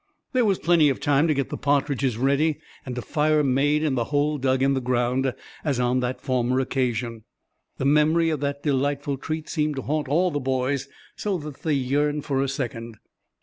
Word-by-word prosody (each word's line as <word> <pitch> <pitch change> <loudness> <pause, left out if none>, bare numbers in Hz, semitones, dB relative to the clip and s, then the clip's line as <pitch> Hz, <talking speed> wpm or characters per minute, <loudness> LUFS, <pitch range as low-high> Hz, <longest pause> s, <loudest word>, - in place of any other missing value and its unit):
There 250 -2 +3
was 195 -3 +2
plenty 165 -3 +4
of 135 - -1
time 145 +1 +2
to 155 - +3
get 135 -1 -1
the - - -4
partridges 140 -4 0
ready 140 +4 +2 0.3
and 125 -1 -5
a 125 - -3
fire 155 -1 +2
made 145 +3 +2
in 150 -3 +1
the 120 -3 0
hole 145 +2 0
dug 130 0 +1
in 135 0 +3
the 135 - -1
ground, 125 +1 +1 0.3
as 140 -5 0
on 125 +1 +2
that 125 0 -2
former 130 -1 0
occasion. 120 -4 -2 0.5
The 135 - -2
memory 155 +3 +3
of 155 - -1
that 140 0 -3
delightful 140 0 0
treat 155 +3 -4
seemed 150 -2 -1
to 135 - -4
haunt 150 0 -1
all 175 +6 +2
the 145 - -1
boys, 130 +1 -1 0.3
so 200 -3 -1
that 150 -4 -9
they 160 - 0
yearned 145 +2 0
for 135 -2 0
a 135 - 0
second. 120 -4 -5
140 Hz, 200 wpm, -24 LUFS, 130-150 Hz, 0.5 s, plenty